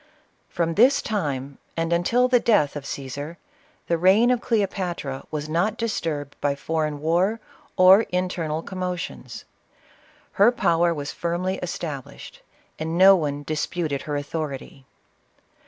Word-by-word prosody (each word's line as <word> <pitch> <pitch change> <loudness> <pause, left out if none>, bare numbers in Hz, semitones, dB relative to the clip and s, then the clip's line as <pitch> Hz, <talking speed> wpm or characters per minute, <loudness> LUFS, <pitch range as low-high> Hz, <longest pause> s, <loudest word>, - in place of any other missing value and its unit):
From 170 -2 -1
this 250 +9 +5
time, 140 - -3 0.2
and 165 +1 0
until 230 +9 +2
after 255 0 +2
the - - -3
death 200 -12 +3
of 145 -2 -6
Ctesar, 140 +4 -6 0.5
the 170 -1 0
reign 200 +8 +5
of 245 -2 +1
Cleopatra 185 - -2
was 150 -1 -4
not 180 +8 0
disturbed 160 - -3
by 145 -1 +1
foreign 155 0 -2
war 180 +8 +1 0.4
or 185 +2 +8
internal 175 -3 -2
commotions. 180 - -5 0.9
Her 205 +4 +5
power 170 -7 +2
was 145 -3 -4
firmly 180 +2 -2
established, 160 -6 -6 0.4
and 160 +2 -2
no 195 +2 +8
one 145 -4 -2
disputed 155 -1 -2
her 150 - -4
authority. 145 -3 -6
170 Hz, 130 wpm, -24 LUFS, 145-190 Hz, 0.9 s, or